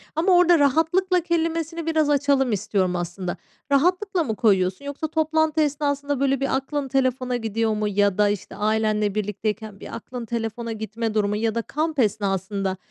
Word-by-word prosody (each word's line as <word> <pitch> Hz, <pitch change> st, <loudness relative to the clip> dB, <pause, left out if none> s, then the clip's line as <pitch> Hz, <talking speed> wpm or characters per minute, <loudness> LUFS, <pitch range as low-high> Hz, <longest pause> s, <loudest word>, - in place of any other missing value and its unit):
Ama 350 Hz, +3 st, +4 dB
orada 350 Hz, -2 st, +5 dB
rahatlıkla 325 Hz, +6 st, +2 dB
kelimesini 330 Hz, -1 st, -1 dB
biraz 315 Hz, -2 st, +1 dB
açalım 280 Hz, -3 st, +2 dB
istiyorum 190 Hz, -3 st, 0 dB
aslında. 175 Hz, +1 st, -4 dB, 0.3 s
Rahatlıkla 360 Hz, +5 st, +2 dB
mı 225 Hz, -7 st, -2 dB
koyuyorsun 190 Hz, +1 st, +1 dB
yoksa 285 Hz, +2 st, -4 dB
toplantı 315 Hz, 0 st, +1 dB
esnasında, 285 Hz, -1 st, -1 dB
böyle, 275 Hz, -1 st, +1 dB
bir 275 Hz, -1 st, 0 dB
aklın 275 Hz, +1 st, -2 dB
telefona 255 Hz, -1 st, 0 dB
gidiyor 225 Hz, -1 st, -1 dB
mu 210 Hz, 0 st, -1 dB
ya 205 Hz, -1 st, +1 dB
da, 210 Hz, -1 st, +4 dB
işte, 205 Hz, -2 st, -4 dB
ailenle 215 Hz, -1 st, 0 dB
birlikteyken 210 Hz, 0 st, -3 dB
bir -, -, -8 dB
aklın 245 Hz, -2 st, -7 dB
telefona 230 Hz, 0 st, -4 dB
gitme 220 Hz, 0 st, -3 dB
durumu 210 Hz, -1 st, +1 dB
ya 220 Hz, +1 st, -1 dB
da 230 Hz, -, +1 dB
kamp 305 Hz, +4 st, -2 dB
esnasında, 195 Hz, -2 st, 0 dB
245 Hz, 160 wpm, -23 LUFS, 210-305 Hz, 0.3 s, orada